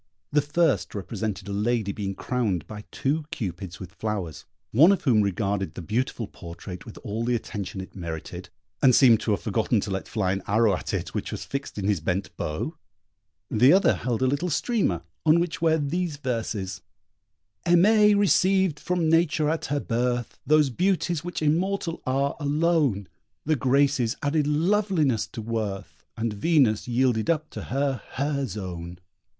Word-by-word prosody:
The 150 - +4
first 145 - +1
represented 100 0 -4
a 100 - -4
lady 105 0 0
being 100 -1 -4
crowned 105 - -1
by 105 -1 -9
two 150 +3 -1
Cupids 95 - -5
with 90 -2 -9
flowers, 100 -7 -4 0.3
one 155 - +7
of 200 - 0
whom 120 -7 +4
regarded 100 -3 -1
the 90 - -6
beautiful 115 +4 -1
portrait 90 +4 -9
with 110 - -10
all 110 +2 -3
the 120 +1 +1
attention 100 -4 -5
it 95 - -11
merited, 85 -4 -6 0.3
and 130 -2 +6
seemed 120 -5 +6
to - - -4
have 105 - +1
forgotten 110 0 +1
to 100 - -4
let 95 0 -3
fly 95 -4 0
an 95 0 -2
arrow 105 -1 +3
at - - -5
it - - -3
which - - -3
was - - -5
fixed 140 -4 -5
in 100 - -3
his 105 -4 +2
bent 90 +5 -2
bow; 75 0 -3 0.8
the 125 +5 +6
other 195 +2 +5
held 120 -1 -2
a - - +4
little 145 +7 0
streamer, 150 - 0 0.2
on 160 +1 +5
which 170 -2 -2
were 160 -1 +3
these 160 +1 -2
verses: 110 -8 -3 0.9
Aimée 210 +4 +5
received 190 -4 +3
from 180 -2 0
Nature 155 -2 +3
at 165 - -2
her 145 0 -1
birth 120 -1 -2
Those 150 -2 +4
beauties 175 0 0
which 175 -2 -4
immortal 170 +2 0
are, 135 +2 +1
alone. 145 - +1 0.4
The 155 +1 +2
Graces 135 -2 +2
added 145 0 +1
loveliness 160 - +1
to 115 - -7
worth, 110 -3 -4
And 115 -1 -1
Venus 125 -2 +2
yielded 120 -1 +1
up 155 -2 0
to - - -7
her 135 0 -1
her 140 0 -1
zone. 90 -4 -6
125 Hz, 165 wpm, -25 LUFS, 100-155 Hz, 0.9 s, one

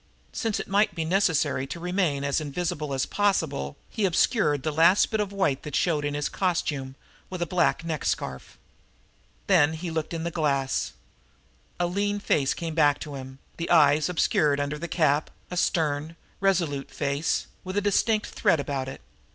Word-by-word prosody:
Since 225 -3 -1
it - - -5
might 200 -2 +2
be 165 -2 -2
necessary 160 -7 +1
to 170 - -6
remain 175 -5 0
as 140 +2 0
invisible 155 0 -3
as 135 -1 0
possible, 160 - 0
he 215 - -1
obscured 165 - +2
the 155 - 0
last 165 +6 +4
bit 220 - 0
of 205 -2 -1
white 190 -9 0
that 150 - -6
showed 155 -4 +1
in 145 0 -2
his 145 0 -1
costume, 145 -7 -1 0.3
with 185 - -5
a 175 - 0
black 170 -1 +1
neck 160 -3 -3
scarf. 65 0 -3 0.9
Then 145 +2 +4
he 165 +1 -5
looked 160 -1 -3
in 165 -1 -3
the 170 - -2
glass. 140 -5 0 0.9
A 175 - +2
lean 205 +3 -1
face 140 -8 +1
looked 165 -2 -3
back 145 -3 +4
at - - -8
him, 130 -1 -8 0.2
the 165 - -4
eyes 150 -1 +5
obscured 150 -4 +2
under 145 +1 -2
the 170 - -4
cap, 155 -3 +1 0.2
a - - -3
stern, 160 -2 0 0.2
resolute 170 -8 0
face, 140 +3 -1 0.2
with 185 +2 -5
a - - +5
distinct 210 +2 +2
threat 160 - +1
about 140 -2 -3
it. - - -9
160 Hz, 175 wpm, -26 LUFS, 145-180 Hz, 0.9 s, eyes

